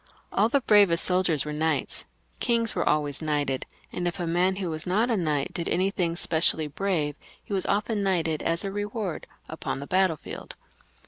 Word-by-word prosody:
All 210 Hz, +3 st, +3 dB
the 280 Hz, +3 st, +2 dB
bravest 200 Hz, -7 st, +5 dB
soldiers 180 Hz, -5 st, +2 dB
were 150 Hz, -, -4 dB
knights, 160 Hz, +1 st, -1 dB, 0.3 s
kings 230 Hz, -2 st, +2 dB
were -, -, 0 dB
always 150 Hz, -1 st, +1 dB
knighted, 145 Hz, -4 st, -1 dB, 0.3 s
and 175 Hz, 0 st, -2 dB
if 175 Hz, +2 st, -3 dB
a 175 Hz, -, -1 dB
man 175 Hz, +3 st, +2 dB
who 185 Hz, -3 st, -3 dB
was 155 Hz, +3 st, -2 dB
not 215 Hz, +7 st, +2 dB
a -, -, +3 dB
knight 150 Hz, -7 st, -1 dB
did 170 Hz, -, -2 dB
anything 180 Hz, -2 st, 0 dB
specially 160 Hz, -2 st, +3 dB
brave, 150 Hz, -2 st, -1 dB, 0.3 s
he -, -, -7 dB
was 190 Hz, -, -1 dB
often 210 Hz, +1 st, 0 dB
knighted, 165 Hz, -5 st, +1 dB
as 165 Hz, 0 st, 0 dB
a 195 Hz, -, -3 dB
reward, 205 Hz, -3 st, -4 dB, 0.2 s
upon 160 Hz, -3 st, -4 dB
the 140 Hz, -, -6 dB
battlefield. 185 Hz, -2 st, -1 dB
175 Hz, 180 wpm, -26 LUFS, 155-195 Hz, 0.3 s, bravest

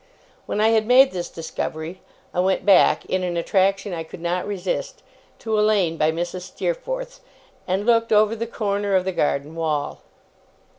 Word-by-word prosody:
When -, -, -2 dB
I 220 Hz, +1 st, +4 dB
had 220 Hz, -1 st, +2 dB
made 265 Hz, +2 st, +6 dB
this 175 Hz, -1 st, -4 dB
discovery, 160 Hz, +1 st, -5 dB, 0.3 s
I -, -, -1 dB
went 190 Hz, +1 st, +1 dB
back, 195 Hz, -3 st, +5 dB
in 185 Hz, -, -1 dB
an 175 Hz, -1 st, -2 dB
attraction 195 Hz, +3 st, +1 dB
I 165 Hz, -1 st, -4 dB
could 160 Hz, -, -11 dB
not 175 Hz, +3 st, -2 dB
resist, 190 Hz, -3 st, -4 dB, 0.3 s
to 220 Hz, -1 st, -1 dB
a -, -, +4 dB
lane 200 Hz, -6 st, +2 dB
by 155 Hz, 0 st, +2 dB
Mrs. 175 Hz, +2 st, -4 dB
Steerforth's, -, -, -4 dB, 0.5 s
and 190 Hz, +2 st, -1 dB
looked 230 Hz, -1 st, +3 dB
over 215 Hz, +1 st, +4 dB
the 230 Hz, +1 st, -4 dB
corner 205 Hz, -3 st, -1 dB
of 185 Hz, -1 st, +2 dB
the 190 Hz, -, 0 dB
garden 150 Hz, -3 st, -1 dB
wall. 155 Hz, -3 st, -2 dB
190 Hz, 170 wpm, -22 LUFS, 175-215 Hz, 0.5 s, made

